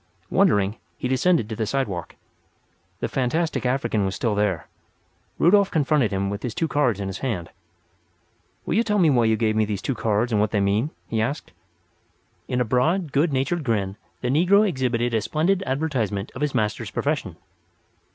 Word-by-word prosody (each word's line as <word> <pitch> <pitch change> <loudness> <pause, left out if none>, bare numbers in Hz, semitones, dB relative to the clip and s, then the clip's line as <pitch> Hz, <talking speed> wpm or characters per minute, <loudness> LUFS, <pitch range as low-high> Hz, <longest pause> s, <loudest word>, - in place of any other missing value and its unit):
Wondering, 100 +1 +3 0.2
he - - -2
descended 130 -1 +2
to 110 - -5
the 110 0 -2
sidewalk. 105 - -2 0.9
The - - 0
fantastic 135 +2 -1
African 120 -5 0
was 95 0 -1
still 115 -3 0
there. 100 -5 0 0.7
Rudolf 195 +3 +4
confronted 150 - +2
him 100 0 -1
with 100 +1 -4
his 120 - -4
two 165 - 0
cards 125 -9 +1
in 100 - -3
his 95 0 -5
hand. 100 -11 -3 1.1
"Will - - -1
you 225 - +3
tell 210 -2 0
me 170 -6 +4
why 120 -3 +3
you 110 0 +3
gave 110 -1 +1
me 110 - +3
these 105 -2 -3
cards 115 -2 0
and 105 -2 +2
what 105 - +2
they 105 - 0
mean?" 100 +7 +1 0.2
he 110 -1 -1
asked. 135 +7 -3 1.0
In 125 - -1
a 125 - +2
broad, 155 - +1
good 150 +4 +2
natured 140 +5 0
grin 100 -6 -1 0.3
the 125 - -1
negro 185 +9 +4
exhibited 120 -7 0
a 110 - +2
splendid 160 - +1
advertisement 125 -8 -1
of 130 - -8
his 150 -3 -1
master's 105 -3 -1
profession. - - -2
120 Hz, 180 wpm, -24 LUFS, 105-150 Hz, 1.1 s, Rudolf